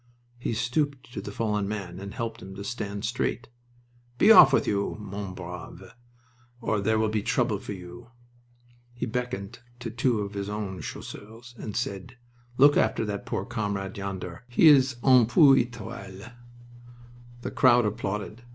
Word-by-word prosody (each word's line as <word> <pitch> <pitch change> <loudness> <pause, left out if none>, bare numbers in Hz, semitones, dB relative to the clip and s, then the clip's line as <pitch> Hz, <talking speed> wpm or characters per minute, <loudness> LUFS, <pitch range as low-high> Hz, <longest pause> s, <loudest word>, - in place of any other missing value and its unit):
He 120 - -2
stooped 125 +2 -2
to 100 - -4
the 105 - -7
fallen 105 -2 -1
man 95 -4 -5
and 100 +1 -8
helped 115 -1 -4
him 95 0 -9
to 100 - -7
stand 105 -2 -4
straight. 120 +1 -2 0.7
"Be 215 - +6
off 170 -11 +10
with - - +3
you, 100 -1 -1
mon 100 -2 -6
brave, 90 +1 -9 0.7
or 110 -3 -1
there 110 +2 +2
will 110 0 +2
be 105 -1 -1
trouble 110 -1 0
for 105 - -6
you." 95 +6 -11 0.9
He 120 - -3
beckoned 120 -4 -4 0.2
to 120 -2 -5
two 120 -1 +1
of 100 0 -5
his 100 0 -4
own 105 -3 -4
Chasseurs 115 +4 -9
and 110 -3 -7
said: 120 0 -4 0.4
"Look 145 +2 +6
after 110 - +1
that 100 -1 -5
poor - - -2
comrade 100 -5 -3
yonder. 95 -2 -6
He 125 +6 +6
is 130 -3 +5
un 130 -4 +6
peu 135 +2 +7
etoile." 115 -3 -4 1.1
The - - -5
crowd 120 -3 +5
applauded. 105 +1 -3
110 Hz, 160 wpm, -27 LUFS, 100-120 Hz, 1.1 s, off